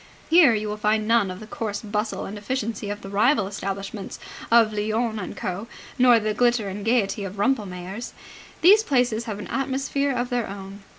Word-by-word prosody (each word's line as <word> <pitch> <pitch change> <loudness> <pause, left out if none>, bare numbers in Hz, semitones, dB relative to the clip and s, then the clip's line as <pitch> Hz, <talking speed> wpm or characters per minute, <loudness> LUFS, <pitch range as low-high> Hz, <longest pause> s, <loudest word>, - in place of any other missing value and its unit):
Here 320 -9 +7
you 215 0 -2
will 210 0 -3
find 215 0 +1
none 230 -4 +3
of 185 0 -6
the 215 - -9
coarse 215 -1 -4
bustle 210 +1 -2
and 200 - -6
efficiency 220 -1 -3
of 205 0 -5
the 195 - -8
rival 215 +3 +3
establishments 195 0 -5 0.3
of 230 -2 +5
Lyons 220 +2 -1
and 180 - -7
Co., 190 +5 -4 0.3
nor 245 -2 +6
the 215 0 -1
glitter 240 -1 +2
and 200 +2 -6
gaiety 210 -3 +1
of 195 0 -6
Rumpelmayer's. 200 -2 -2 0.5
These 405 +6 +7
places 245 - +1
have 215 -3 -4
an 205 - -7
atmosphere 275 +1 -1
of 245 -1 -2
their 245 -2 0
own. 195 0 -8
215 Hz, 185 wpm, -24 LUFS, 200-240 Hz, 0.5 s, Here